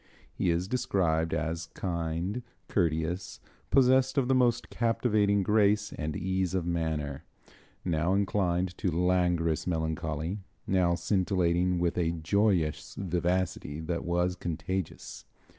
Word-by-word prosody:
He - - 0
is 85 +2 0
described 85 -9 +1
as 80 +1 -2
kind, 85 +4 -2 0.3
courteous, 85 0 -1 0.3
possessed 130 0 +4
of 130 -3 +3
the 130 - +3
most 125 -2 +2
captivating 105 -4 +2
grace 105 0 +2
and 75 -1 -4
ease 95 0 -1
of 90 -3 0
manner, 80 -4 -2 0.6
now 85 +1 +1
inclined 95 -3 0
to 95 - +1
languorous 90 -1 +1
melancholy, 80 +2 -2 0.3
now 90 -2 +2
scintillating 90 -2 +1
with 85 0 0
a 85 -1 +1
joyous 85 -1 0
vivacity 90 -4 -1
that 85 +1 -3
was 90 +1 0
contagious. 90 +1 -4
90 Hz, 115 wpm, -29 LUFS, 80-100 Hz, 0.6 s, possessed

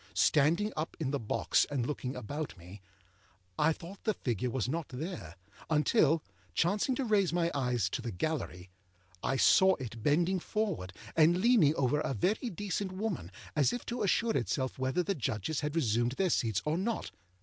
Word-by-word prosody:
Standing 170 +9 +3
up 155 +2 -4
in 145 -5 -1
the 140 - -1
box 110 - +2
and 135 -5 -1
looking 130 -2 -3
about 140 +3 -5
me, 90 +4 -12 0.8
I 155 +2 +4
thought 180 +4 -8
the 215 -3 +1
figure 120 -1 -2
was 125 -2 -1
not 160 +3 -3
there, 135 - -6 0.3
until, 155 0 +3 0.3
chancing 205 - +2
to 270 - -1
raise 205 -6 +3
my 170 0 +1
eyes 125 -4 0
to 130 - -2
the 120 - -4
gallery, 90 - -3 0.5
I 135 - 0
saw 190 +6 +6
it 115 -4 -7
bending 170 - +2
forward, 185 - -2 0.2
and 165 +2 +5
leaning 185 - +4
over 140 +1 +1
a 135 - -2
very 210 - 0
decent 200 -1 -3
woman, 185 - -3 0.2
as 150 - +3
if 245 - -4
to 240 - -3
assure 220 +3 +2
itself 130 +5 -1
whether 130 +7 +1
the 200 - 0
Judges 130 - -2
had 150 0 -3
resumed 120 -5 +1
their 185 +5 +1
seats 110 -5 +1
or 155 +3 0
not. 225 +4 -2
155 Hz, 175 wpm, -31 LUFS, 125-190 Hz, 0.8 s, saw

